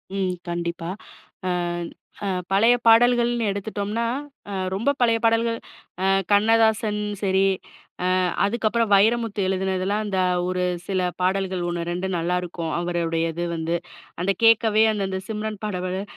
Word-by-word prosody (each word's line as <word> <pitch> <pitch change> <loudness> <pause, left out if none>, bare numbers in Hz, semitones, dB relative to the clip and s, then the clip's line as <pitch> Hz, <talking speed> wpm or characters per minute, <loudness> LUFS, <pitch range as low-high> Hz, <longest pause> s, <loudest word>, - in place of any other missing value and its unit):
ம் 190 -2 0 0.2
கண்டிப்பா. 170 0 -3 0.6
அ - - +1 0.8
அ - - -1 0.2
பழைய 225 +5 +5
பாடல்கள்னு 240 0 +4
எடுத்துட்டோம்னா, 205 +2 -2 0.5
அ - - -4 0.2
ரொம்ப 215 +8 0
பழைய 230 -2 +4
பாடல்கள், 230 0 +2 0.5
அ - - +2 0.3
கண்ணதாசன் 220 0 +3 0.2
சரி, 190 -1 +2 0.8
அ - - +2 0.2
அதுக்கப்பறம் 225 +1 0
வைரமுத்து 220 0 +2
எழுதுனதெல்லாம், 190 +2 -1
இந்த 195 -2 -1 0.3
ஒரு 185 0 -1 0.2
சில 190 -2 0 0.2
பாடல்கள் 185 -1 0
1, 170 -1 -3
2 180 +2 -2
நல்லா 175 +2 0
இருக்கும் 170 -2 -4
அவருடையது 170 -1 -1
வந்து. 165 +1 -1 0.4
அந்த 195 +2 +1
கேட்கவே, 220 -1 +5
அந்த 200 -2 -1
அந்த 190 0 -3
சிம்ரன் 215 -1 -4
பாடல 185 -1 -3
195 Hz, 125 wpm, -23 LUFS, 180-225 Hz, 0.8 s, பழைய